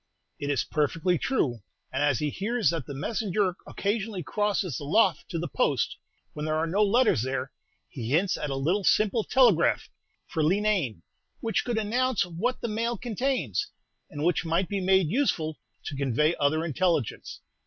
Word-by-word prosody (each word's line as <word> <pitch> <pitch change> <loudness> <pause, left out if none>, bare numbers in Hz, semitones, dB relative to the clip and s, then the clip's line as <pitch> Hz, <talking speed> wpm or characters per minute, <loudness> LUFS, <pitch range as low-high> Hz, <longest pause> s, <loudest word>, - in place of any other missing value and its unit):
"It 145 - -3
is 140 -5 +1
perfectly 165 +3 0
true; 130 - 0 0.3
and 135 - 0
as 145 -3 +3
he 150 -1 -1
hears 215 - 0
that 165 -6 -4
the 140 - -5
messenger 195 - -1
occasionally 205 -2 -2
crosses 195 - -1
the - - -7
lough 190 +11 +3
to 170 - -3
the 170 +1 -2
post, - - 0 0.4
when 150 - -5
there 155 0 0
are 160 +1 +1
no 185 +6 0
letters 220 - +3
there, 130 +1 -3 0.4
he 120 -4 -6
hints 175 +8 +2
at 150 - -4
a 135 - -2
little 170 +10 0
simple 215 +3 +3
telegraph 235 -11 +3 0.3
for 160 - -2
Leenane, 180 - +1 0.4
which 225 -1 -2
should 240 -2 0
announce 235 +1 +1
what 180 +9 -2
the - - -2
mail 230 +2 -1
contains, 235 - -1 0.4
and 145 0 -5
which 175 +1 +2
might 170 +2 0
be 200 -1 -2
made 190 -2 +3
useful 160 - 0 0.3
to 150 - -4
convey 140 +4 +1
other 155 +3 +2
intelligence. 165 - -1
175 Hz, 170 wpm, -27 LUFS, 150-215 Hz, 0.4 s, as